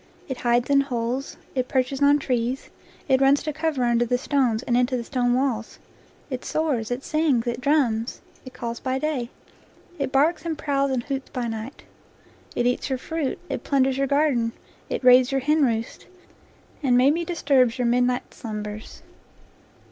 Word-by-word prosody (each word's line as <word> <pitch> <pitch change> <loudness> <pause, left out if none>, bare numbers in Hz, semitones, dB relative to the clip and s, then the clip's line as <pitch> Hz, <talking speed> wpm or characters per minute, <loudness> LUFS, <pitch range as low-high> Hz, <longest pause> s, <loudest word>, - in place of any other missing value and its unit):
It 265 - -4
hides 240 0 +1
in 280 0 +6
holes, 250 0 -3 0.2
it 255 -1 -1
perches 265 +1 -1
on 285 +1 +6
trees, 250 -1 -2 0.4
it 265 0 +3
runs 275 +1 +4
to 305 - -3
cover 310 -4 -1
under 240 0 +3
the 245 +1 +1
stones 255 -4 0
and 240 - 0
into 250 +1 +2
the 235 - -4
stone 245 -1 0
walls; 250 -4 -1 0.5
it 255 -1 -4
soars, 280 -9 -1
it 245 +2 -3
sings, 305 -7 +1
it 240 +1 -3
drums, 255 -6 +1 0.2
it 255 - -10
calls 235 -1 -5
by 260 0 -1
day, 265 -4 -2 0.7
it 275 -2 -1
barks 300 +4 +2
and 330 -2 -3
prowls 280 -2 0
and 255 -3 -1
hoots 270 0 -4
by 250 -3 -3
night. 225 +4 -6 0.7
It 240 - 0
eats 245 +3 0
your 265 - 0
fruit, 315 +1 -3
it - - -4
plunders 270 -1 +1
you? 275 - +1
garden, 270 -5 +1 0.4
it - - -3
raids 250 +1 +6
your 270 0 +1
henroost, 260 -6 0 0.7
and 255 -4 +3
maybe 285 +7 +3
disturbs 275 -8 +2
your 250 - 0
midnight 245 +1 +1
slumbers. 210 -1 -7
260 Hz, 170 wpm, -24 LUFS, 240-280 Hz, 0.7 s, in